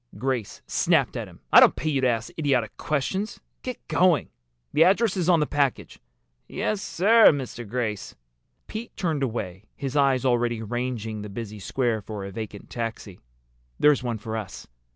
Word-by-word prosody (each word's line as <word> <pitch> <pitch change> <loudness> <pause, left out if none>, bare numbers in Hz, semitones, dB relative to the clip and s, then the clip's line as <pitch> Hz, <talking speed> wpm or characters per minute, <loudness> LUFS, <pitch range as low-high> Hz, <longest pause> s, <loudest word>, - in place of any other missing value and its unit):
Grace 130 -5 -3
snapped - - +2
at - - -4
him. - - -16
"I - - +11
don't - - +6
pay 155 - -2
you 135 -2 +1
to 130 - +3
ask 115 -1 -1
idiotic 125 -8 +1
questions. 170 +8 -2 0.2
Get 255 -2 -7
going! 175 - +3 0.4
The 160 - +6
address 200 +3 +3
is 180 -2 0
on 170 -3 +5
the - - +3
package." 145 -3 -1 0.5
"Yes, 210 -2 -2
sir, 220 +4 +5
Mr. 125 -6 0
Grace." 110 -4 -3 0.5
Pete 225 +2 -7
turned 160 -6 -1
away, 105 -6 -3
his 135 0 -5
eyes 135 -2 +3
already 120 -2 +1
ranging 115 -2 -3
the 105 - -7
busy 105 0 -7
square 115 +2 -1
for 105 -1 -6
a 100 - -7
vacant 105 0 -7
taxi. 115 -5 -5 0.6
"There's 150 -2 +5
one 120 -2 -2
for 110 +1 -5
us!" 105 -4 -6
125 Hz, 170 wpm, -25 LUFS, 110-150 Hz, 0.6 s, I